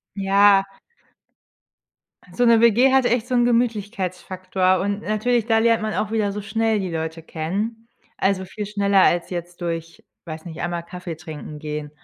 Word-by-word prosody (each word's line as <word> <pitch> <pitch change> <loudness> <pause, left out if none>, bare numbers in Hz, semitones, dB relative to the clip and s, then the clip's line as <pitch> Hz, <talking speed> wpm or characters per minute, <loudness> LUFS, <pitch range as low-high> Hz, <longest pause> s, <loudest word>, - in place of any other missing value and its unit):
Ja. 195 0 +4 1.7
So 245 - +2
'ne 230 -1 +5
WG 235 +3 +5
hat 265 -2 +4
echt 240 -1 +1
so 255 - -1
'n 240 -1 +4
Gemütlichkeitsfaktor 190 -5 0
und 200 +1 -2
natürlich 220 +2 0
da 225 -1 +3
lernt 230 0 +3
man 215 0 -2
auch 215 - -1
wieder 215 -2 0
so 210 +1 -5
schnell 220 +1 0
die 190 -3 -3
Leute 160 0 -4
kennen. 205 +9 -4 0.3
Also, 190 -1 +1
viel 205 +3 -6
schneller 200 -1 +2
als 175 0 +2
jetzt 175 0 -6
durch, 165 -1 -5 0.2
weiß 160 -1 -7
nicht, 165 -3 -8
einmal 175 -1 -3
Kaffeetrinken 160 -4 -8
gehen. 150 -1 -5
200 Hz, 160 wpm, -22 LUFS, 175-225 Hz, 1.7 s, ne